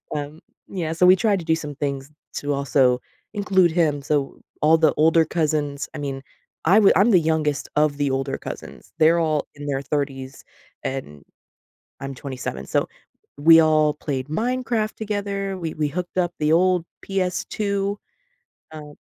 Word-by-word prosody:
um, 150 +1 -5 0.3
yeah, 170 -5 -3
so 180 +2 +3
we 185 - +8
tried 205 -2 +2
to 165 - -8
do 160 -1 +2
some 150 -2 -6
things 140 0 -4 0.2
to 145 - -2
also 130 -2 +2 0.3
include 190 -4 +2
him, 155 -4 +1
so 145 -1 -1 0.2
all 155 +2 +5
the 160 -3 +3
older 160 +1 +5
cousins 150 -3 -1
I - - -5
mean, 135 -2 -4 0.4
I 190 +6 +6
wou 205 - +6
I'm 210 +5 +4
the 180 - +6
youngest 155 -3 -1
of 150 -1 +2
the 140 -2 0
older 135 +1 -2
cousins. - - -9
They're 165 +2 +5
all 155 -2 0
in 145 - -9
their 135 -1 -1
30s, 135 -3 -4 0.4
and 100 - -5 0.8
I'm 135 0 -5
27, 125 - -6
so, - - 0 0.5
we 165 +3 +7
all 155 -1 +3
played 135 -3 -4
Minecraft 230 +3 -1
together, 200 -2 -3
we 165 -3 -4
we 150 -1 0
hooked 180 +4 -5
up 175 -1 +1
the 150 0 +1
old 180 0 +3 0.2
PS2. 200 +1 -2 0.7
Um 150 -1 -10
155 Hz, 160 wpm, -22 LUFS, 145-180 Hz, 0.8 s, we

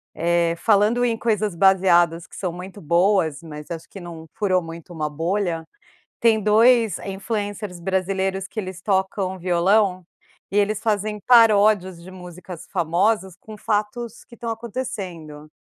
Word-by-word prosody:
Eh, 170 0 +1
falando 215 +5 +3
em 230 -2 0
coisas 215 -4 0
baseadas 175 -2 +3
que - - -15
são 185 -3 -3
muito 185 +3 -9
boas, 170 -1 +2
mas 150 -1 -9
acho 165 -1 -7
que 195 - -10
não 170 -2 -9
furou 185 -3 +1
muito 165 +1 -10
uma 155 -2 -3
bolha, 165 +1 -2 0.6
tem 225 -2 +4
2 225 +1 +4
influencers 205 -1 -4
brasileiros, 190 +1 -1
que - - -10
eles 185 -2 -7
tocam 190 -1 -1
violão 185 +2 +2 0.5
e - - -1
eles 205 +1 +1
fazem 210 -1 -1
paródias 210 -6 +5
de 185 - -11
músicas 180 -1 -10
famosas, 190 +3 +1
com 215 -1 -11
fatos 215 +2 -3
que 235 - -16
estão 235 - -6
acontecendo. 195 - -6
190 Hz, 140 wpm, -22 LUFS, 170-210 Hz, 0.6 s, paródias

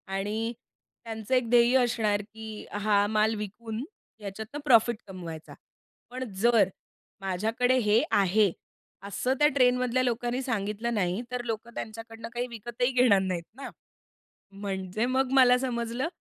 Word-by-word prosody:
आणि 215 +4 -2 0.5
त्यांचं 225 +1 -5
एक 250 -3 +1
ध्येय 240 +1 +5
असणार 215 -4 +1
की 220 -1 -8
हा 205 0 +2
माल 215 +1 +2
विकून 220 +3 -5 0.4
याच्यातनं 220 +8 -6
प्रॉफिट 235 -3 +5
कमवायचा. 170 -4 -8 0.6
पण 255 +1 -5 0.2
जर 230 -4 +5 0.5
माझ्याकडे 225 +7 +1
हे 210 0 +3
आहे 200 0 +3 0.6
असं 250 +6 0
त्या 295 - +6
ट्रेनमधल्या 250 -1 +3
लोकांनी 245 +1 -1
सांगितलं 225 -1 -2
नाही. 190 +1 0
तर 250 -1 -3
लोकं 230 +1 -4
त्यांच्याकडनं 225 +1 -7
काही 245 +1 -2
विकतही 240 +2 -2
घेणार 245 -6 +5
नाहीत 185 -3 -2
ना, 275 - -7 0.8
म्हणजे 195 +2 -3
मग 260 +1 +1
मला 250 -2 +6
समजलं 240 +1 -2
225 Hz, 130 wpm, -28 LUFS, 205-245 Hz, 0.8 s, त्या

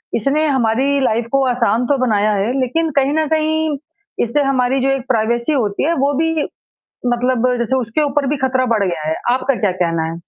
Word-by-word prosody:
इसने 280 +7 +1
हमारी 265 +1 +1
लाइफ़ 230 -1 +1
को 275 0 +2
आसान 245 -1 +1
तो 285 - +2
बनाया 215 -2 +2
है 205 +3 0
लेकिन 320 +6 0
कहीं 275 +1 +3
न 315 0 +1
कहीं, 315 -1 0 0.5
इससे 240 +5 0
हमारी 265 -1 +1
जो 270 - +1
एक 270 -1 -1
प्राइवेसी 235 +3 0
होती 215 -8 -1
है 335 - +2
वो 285 +1 +2
भी 325 +1 +1 0.7
मतलब 245 0 +1
जैसे 235 +2 0
उसके 250 +3 -1
ऊपर 290 0 0
भी 295 - 0
खतरा 260 -1 +1
बढ़ 215 -3 +1
गया 170 -5 -2
है। 160 - 0 0.2
आपका 265 +1 0
क्या 205 -3 +1
कहना 165 -1 0
है? 165 - -7
255 Hz, 200 wpm, -17 LUFS, 225-280 Hz, 0.7 s, कहीं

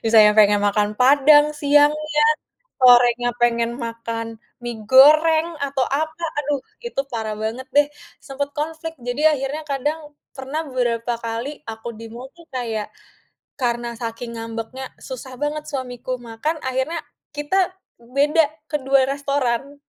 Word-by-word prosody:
Misalnya 220 -2 +6
pengen 205 -1 +6
makan 205 0 +2
padang 290 +3 +6
siangnya, 295 +1 +3 0.6
sorenya 245 -1 +5
pengen 235 -1 +2
makan 230 0 -5 0.4
mie 240 -1 -4
goreng 310 +4 +6 0.2
atau 270 -1 -2
apa, 315 +4 -2 0.2
aduh 290 -1 -1 0.3
itu 470 -13 -1
parah 220 -2 -3
banget 240 +4 -3
deh, 290 0 +6 0.3
sempet 280 +1 -4
konflik 320 +2 -4
jadi 245 +4 -3
akhirnya 280 +2 -3
kadang 290 +3 -1 0.4
pernah 270 +4 -4
beberapa 240 -2 -1
kali 230 +3 -3 0.2
aku 225 +1 -8
di 230 - -8
mobil 265 +8 -11
kayak 225 -4 -3 0.7
karena 240 -1 -1
saking 230 +1 -6
ngambeknya, 230 +3 -6 0.2
susah 260 0 -7
banget 300 +1 -2
suamiku 255 -2 -4
makan 240 +8 -3
akhirnya 265 +6 -1 0.4
kita 295 +6 -1 0.6
beda 300 +4 +4 0.3
kedua 270 -3 +2
restoran, 280 -1 -1
260 Hz, 125 wpm, -21 LUFS, 235-295 Hz, 0.7 s, Misalnya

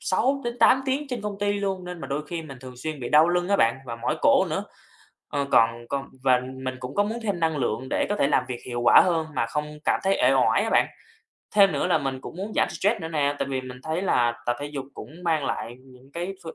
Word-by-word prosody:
6-8 245 +3 +2
tiếng 280 +3 -1
trên 245 -4 -4
công 205 -1 -4
ty 205 0 +1
luôn 195 -2 -2
nên 180 -1 -7
mà 135 - -5
đôi 145 +2 -3
khi 170 0 -4
mình 135 -4 -10
thường 125 -1 -11
xuyên 155 +2 -5
bị 120 - -4
đau 155 +3 +6
lưng 175 +1 0
á 200 - +3
bạn 115 -2 +3
và 115 -1 -5
mỏi - - -1
cổ - - +5
nữa. - - -2 0.6
Ờ, 140 -1 -1
còn 115 +1 +3
còn 140 0 -3
và 130 -2 +4 0.2
mình 130 0 -3
cũng 130 +2 -7
có 205 - +3
muốn 220 +3 -3
thêm 200 -5 -1
năng 160 -2 +1
lượng 125 0 -2
để - - +1
có 205 - +1
thể 140 - +2
làm 135 -3 +2
việc 125 -2 -5
hiệu 120 -1 -4
quả - - +8
hơn 165 -3 0
mà 115 - +1
không 150 +4 -4
cảm - - +2
thấy 195 0 +2
uể - - +6
oải - - +3
á - - -1
bạn. - - +4 0.7
Thêm 195 -3 +6
nữa 140 - 0
là 160 - +3
mình 135 -2 -3
cũng 165 - -9
muốn 205 +3 -5
giảm - - +3
stress 210 +2 0
nữa 160 - -4
nè, 145 -3 0
tại - - -2
vì 130 -1 -1
mình 125 0 -10
thấy 160 +4 -2
là 120 -10 +2
tập 120 0 +1
thể 145 - -3
dục 140 -2 -5
cũng - - -9
mang 160 -4 +1
lại 120 -2 -4
những 130 +1 -18
cái 175 +3 -4
phương 165 - -8
150 Hz, 265 wpm, -25 LUFS, 130-195 Hz, 0.7 s, quả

